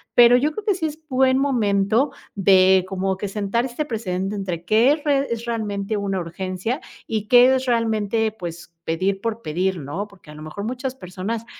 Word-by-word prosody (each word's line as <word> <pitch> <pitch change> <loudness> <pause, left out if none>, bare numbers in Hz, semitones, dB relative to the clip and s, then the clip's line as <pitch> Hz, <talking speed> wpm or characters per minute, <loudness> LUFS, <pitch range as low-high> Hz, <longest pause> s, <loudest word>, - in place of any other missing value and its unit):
pero 240 0 +8
yo 295 +4 +1
creo 420 +7 -6
que, - - 0
sí 345 -3 -2
es 310 0 -4
buen 260 0 +3
momento, 230 -1 +2 0.2
de 190 -1 +5
como 190 0 -2
que, 205 - -4
sentar 210 +4 -1
este 265 +4 -3
precedente 195 -5 -3
entre 175 -4 -4
que 220 +8 +4
es 295 0 -1
re 280 -2 +2
es 230 0 -3
realmente 215 -3 -2
una 195 -2 -1
urgencia, 185 - -3 0.3
y 215 -2 -2
que 250 +3 +7
es 260 0 -1
realmente, 225 -2 +1
pues, 170 -1 -8
pedir 190 +4 -1
por 230 0 -3
pedir, 180 +4 -1
¿no? 160 +9 -5
Porque 190 -6 -16
a - - -10
lo 150 - -11
mejor 155 +6 -7
muchas 255 +3 -4
personas 200 +2 -5
210 Hz, 190 wpm, -22 LUFS, 190-245 Hz, 0.3 s, pero